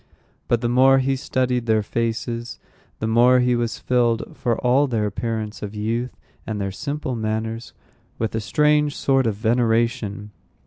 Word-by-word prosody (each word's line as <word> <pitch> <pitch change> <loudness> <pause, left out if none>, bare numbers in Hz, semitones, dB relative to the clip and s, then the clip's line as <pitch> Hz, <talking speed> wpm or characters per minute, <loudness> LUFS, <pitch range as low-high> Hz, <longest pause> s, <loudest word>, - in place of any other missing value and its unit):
But 120 -1 +1
the 120 - 0
more 130 +2 +5
he 135 0 +1
studied 125 -2 -1
their 110 -1 +2
faces, 115 +1 -3 0.4
the - - -3
more 120 +3 +5
he 125 0 +2
was 120 -1 -2
filled, 120 -2 0
for 120 -3 -1
all 135 +4 +4
their 115 -5 0
appearance 110 +1 -4
of 105 0 -6
youth 115 +4 -2 0.3
and 110 -2 -3
their 100 -1 -2
simple 140 +4 -4
manners, 110 +1 -3 0.5
with 110 -1 -2
a 110 - -1
strange 150 +3 +2
sort 135 -3 +2
of 110 - 0
veneration. 110 -2 0
115 Hz, 155 wpm, -22 LUFS, 110-125 Hz, 0.5 s, more